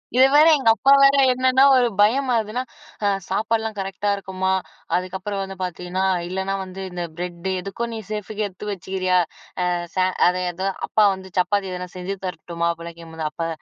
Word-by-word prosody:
இதுல 260 - +7
வேற 305 +2 +8
எங்க 255 -5 +2
அப்பா 270 +4 +3
வேற, 275 0 +6 0.2
என்னன்னா 255 +1 +3
ஒரு 250 -1 +4
பயம் 255 +6 +3
அதுன்னா, 220 +3 -2 0.4
அ - - +3 0.2
"சாப்பாடுலாம் 220 +2 -1
கரெக்ட்டா 195 +1 -2
இருக்குமா? 190 -1 -2 0.4
அதுக்கப்புறம் 190 +2 -3
வந்து 195 0 -7
பாத்தீங்கன்னா 180 +1 -3 0.2
இல்லனா 190 +2 -2
வந்து 190 +1 -8
இந்த 175 0 -4
பிரெட்டு, 180 +1 -4
எதுக்கோ 195 +5 -4
நீ 220 - -4
சேஃபுக்கு 210 0 -3
எடுத்து 200 +2 -8
வெச்சுக்குறியா. 185 -1 0 0.5
அ, - - +1 0.3
ச - - -9 0.3
அதேதா 180 +1 -1 0.2
அப்பா 215 - +3
வந்து 190 -1 -10
சப்பாத்தி 190 +1 +1
எதனா 180 0 -5
செஞ்சு 185 +2 -4
தரட்டுமா?" 170 -1 -3
அப்டிலாம் 170 0 -10
கேக்கும்போது, 160 -1 -7
"அப்பா 165 +2 -3
190 Hz, 165 wpm, -22 LUFS, 180-215 Hz, 0.5 s, வேற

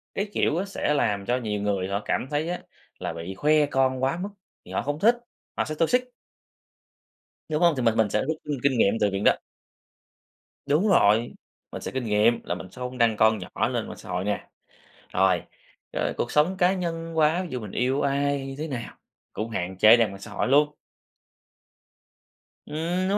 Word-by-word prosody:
cái 200 +1 -2
kiểu 170 +6 +1
sẽ 195 -6 -1
làm 105 -8 0
cho 125 +3 +1
nhiều 105 -4 -3
người 100 -2 0
họ 100 +2 -2
cảm - - -1
thấy 150 +3 -1
á, 180 - -2 0.4
là - - -3
bị 85 +3 -6
khoe 150 +5 +3
con 130 -2 +1
quá 135 +5 +1
mức 200 - -3 0.4
thì - - -12
họ - - 0
không 145 +1 -3
thích, 230 +6 +5 0.4
họ - - +1
sẽ 155 - -4
toxic. 250 +11 +1 1.4
Đúng 155 +1 -1
hông? 170 -1 +5
Thì 130 - -1
mình 115 -2 +3
mình 110 -2 +3
sẽ 105 - +1
rút - - -4
rút, 160 0 -1
ưm, 145 -1 -3
kinh 135 -3 +3
nghiệm 100 -3 +4
từ 105 - +3
viện 95 +1 -2
đó. - - +5 1.3
Đúng 150 +9 +2
rồi, 115 - +4 0.4
mình - - -6
sẽ - - -5
kinh 130 -1 -3
nghiệm 110 +2 +3
là 90 - -2
mình 90 0 -8
sẽ 125 - -12
hông 125 0 -5
đăng 115 -3 +3
con 110 0 +4
nhỏ 90 - -2
lên - - -2
mạng - - -8
xã - - -12
hội 90 +1 -1
nè. 105 +1 -3 0.6
Rồi, 95 -2 +3 0.5
ờ, - - -1
cuộc 120 - -2
sống 165 +6 +2
cá 180 0 +4
nhân 165 -3 -4
quá, 160 +4 +3
ví 180 - -7
dụ, 125 - -3
mình 105 -4 -8
yêu 130 +3 0
ai, 140 0 0
như 135 - -6
thế 155 +2 -3
nào 125 -5 -6 0.4
cũng 110 +2 -4
hạn 95 -3 -4
chế 110 +3 +6
đem - - -2
lên 115 -4 +2
mạng 100 - -10
xã 110 - -9
hội 100 - -1
luôn. 145 +3 +4 1.9
Ừm, 175 +5 -1
đúng 200 - +2
130 Hz, 210 wpm, -25 LUFS, 105-155 Hz, 1.9 s, chế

